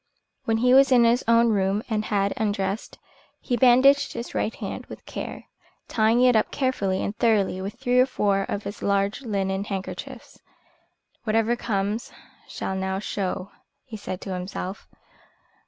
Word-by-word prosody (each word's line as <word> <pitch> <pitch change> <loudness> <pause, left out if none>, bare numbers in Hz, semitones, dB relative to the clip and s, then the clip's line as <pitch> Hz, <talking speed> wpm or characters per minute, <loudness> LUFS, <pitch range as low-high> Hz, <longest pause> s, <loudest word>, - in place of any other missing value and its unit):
When 225 0 +1
he 250 +2 +3
was 270 +1 +6
in 245 -2 +6
his 235 +2 +3
own 230 0 +5
room 200 +1 +1
and 215 -2 -1
had 200 -1 0
undressed, 205 -1 -2 0.4
he 245 - -1
bandaged 260 +4 +5
his 235 - -6
right 225 - -1
hand - - -6
with - - -11
care, - - -6 0.4
tying 225 +2 +3
it 250 -1 +5
up 215 - +2
carefully 205 -8 -1
and 205 - -3
thoroughly 210 -6 +1
with 195 +2 -5
three 250 -1 +1
or 255 - +5
four 200 -6 +1
of 205 - -3
his 205 - -7
large 200 +3 0
linen 195 -5 -1
handkerchiefs. 195 -2 -7 0.8
"Whatever 225 +1 +1
comes, 210 -1 -2 0.4
shall - - -4
now 190 0 -2
show," 195 -1 -3 0.3
he 235 - -9
said 190 -3 -6
to 190 - -5
himself. 185 +1 -5
215 Hz, 155 wpm, -25 LUFS, 195-240 Hz, 0.8 s, was